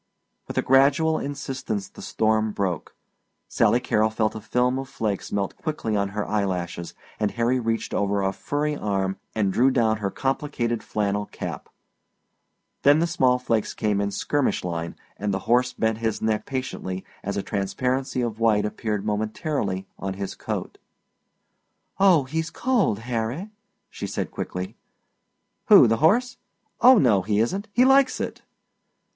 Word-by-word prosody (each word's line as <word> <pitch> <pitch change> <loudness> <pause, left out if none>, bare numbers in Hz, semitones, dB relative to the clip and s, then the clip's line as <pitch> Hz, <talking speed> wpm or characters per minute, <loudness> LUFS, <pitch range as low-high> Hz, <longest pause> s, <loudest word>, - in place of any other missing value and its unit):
With - - -7
a - - +2
gradual 140 +4 +4
insistence 135 -7 -4
the - - -13
storm 110 -1 +1
broke. 95 -6 -3 0.5
Sally 120 - +3
Carrol 110 -3 +2
felt 110 0 0
a 110 - -7
film 125 +4 +1
of 135 0 -6
flakes 105 -3 -3
melt 100 -1 -1
quickly 150 -9 -2
on 100 -1 0
her 105 +1 -3
eyelashes, 90 -4 -2 0.2
and 105 -1 +1
Harry 120 +4 +1
reached 115 -1 -2
over 100 0 +1
a 95 0 0
furry 150 +7 -2
arm 95 -5 -1 0.2
and 100 -3 +1
drew 130 +6 +4
down 115 -4 +2
her 100 -2 -2
complicated 130 -2 -2
flannel 105 -1 -1
cap. - - -6 1.1
Then 145 +1 +6
the 165 - +2
small 130 -7 +2
flakes 115 -4 -1
came 105 -2 0
in 100 - 0
skirmish 135 +8 0
line, 85 -1 -4 0.2
and 105 0 -2
the 95 - 0
horse 125 +1 +3
bent 110 -2 -1
his 110 -2 -1
neck 110 -1 -1
patiently 110 -8 -4 0.2
as 100 0 -3
a 100 - -1
transparency 125 +6 -1
of 115 -2 -3
white 110 -2 +3
appeared 105 -1 -3
momentarily 105 -1 -2
on 95 0 -3
his 100 0 -4
coat. - - -5 1.2
"Oh, 185 -7 +6
he's 160 +5 -3
cold, 235 - +1
Harry," 125 - -3 0.4
she - - -6
said - - -3
quickly. 90 +1 -5 0.9
"Who? - - +9
The 115 -1 +2
horse? 235 - +3 0.4
Oh, 255 0 +8
no, 110 - +4
he 105 +2 0
isn't. 190 - 0
He 245 +4 +4
likes 270 0 +4
it!" - - -4
110 Hz, 155 wpm, -24 LUFS, 100-135 Hz, 1.2 s, Who